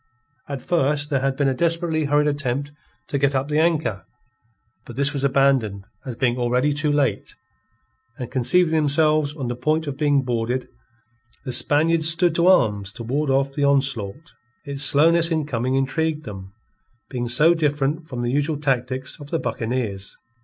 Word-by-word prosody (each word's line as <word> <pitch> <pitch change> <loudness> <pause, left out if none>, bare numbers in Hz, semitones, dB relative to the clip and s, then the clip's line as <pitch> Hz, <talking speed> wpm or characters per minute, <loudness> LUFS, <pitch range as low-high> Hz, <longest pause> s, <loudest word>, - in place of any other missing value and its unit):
At 140 -2 -5
first 150 -2 0
there 135 - +2
had 135 0 -1
been 140 0 0
a 135 - +1
desperately 165 +2 +1
hurried 145 +1 +2
attempt 145 -1 -2 0.4
to 140 - -1
get 140 0 +1
up 135 +2 -1
the 150 +1 +1
anchor; 160 - 0 0.8
but 120 - -11
this 140 +3 0
was 140 -2 -3
abandoned 130 -8 +1 0.2
as 125 - -5
being 120 0 0
already 125 +4 +1
too 145 +1 -1
late; 145 -2 -1 0.8
and 125 -2 -7
conceiving 160 +7 +2
themselves 155 -1 +3
on 135 -5 -4
the 120 - -3
point 155 +6 -1
of 140 -1 -6
being 145 -3 +2
boarded, 120 +1 -2 0.8
the 125 - -4
Spaniards 160 +4 +3
stood 170 +1 +3
to 170 +2 +2
arms 105 - +3
to 115 - -8
ward 140 +5 -1
off 135 +1 +1
the 145 - -2
onslaught. 135 -1 -1 0.3
Its 140 -1 -4
slowness 165 +4 +4
in 160 -3 -1
coming 130 -2 -2
intrigued 155 +3 -1
them, 95 -3 -9 0.6
being 120 -2 -3
so 155 +7 +5
different 150 0 -1
from 125 -6 -5
the 120 - -1
usual 145 +2 0
tactics 130 -1 -2
of 145 -1 -11
the 165 - -1
buccaneers. 110 -8 -4
140 Hz, 170 wpm, -22 LUFS, 125-155 Hz, 0.8 s, so